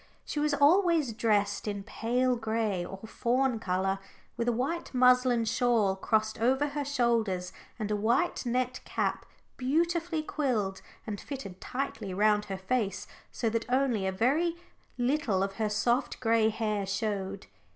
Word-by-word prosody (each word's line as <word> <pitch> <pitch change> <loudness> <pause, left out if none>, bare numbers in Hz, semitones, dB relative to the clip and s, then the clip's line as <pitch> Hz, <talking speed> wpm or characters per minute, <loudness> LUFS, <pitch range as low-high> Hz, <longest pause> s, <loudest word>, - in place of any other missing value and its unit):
She 295 - -3
was 300 0 +2
always 320 - +4
dressed 210 -2 +1
in 200 -1 -3
pale 250 +5 0
gray 220 -5 -1
or 195 +2 -7
fawn 245 +2 0
colour, 190 -1 0 0.4
with 235 - -2
a - - +4
white 270 +6 -2
muslin 250 -2 +4
shawl 225 -4 +2
crossed 220 +3 0
over 265 +5 +2
her 290 0 -3
shoulders, 230 -9 0 0.2
and 215 -2 -3
a - - +2
white 235 - +1
net 250 0 -1
cap - - -2 0.3
beautifully 330 +4 0
quilled 225 -12 -1 0.2
and 205 -3 -5
fitting 265 -10 -6
tightly 225 -7 -4
round 210 +1 +3
her 195 -2 -4
face, 200 -1 -1 0.3
so 235 - -2
that 230 +1 -2
only 250 -6 +1
a - - +1
very 285 - +1 0.4
little 245 -6 +1
of 195 0 -4
her 215 -1 0
soft 235 +5 0
gray 225 -2 +3
hair 215 -2 -2
showed. 195 -1 -2
230 Hz, 150 wpm, -29 LUFS, 205-260 Hz, 0.4 s, always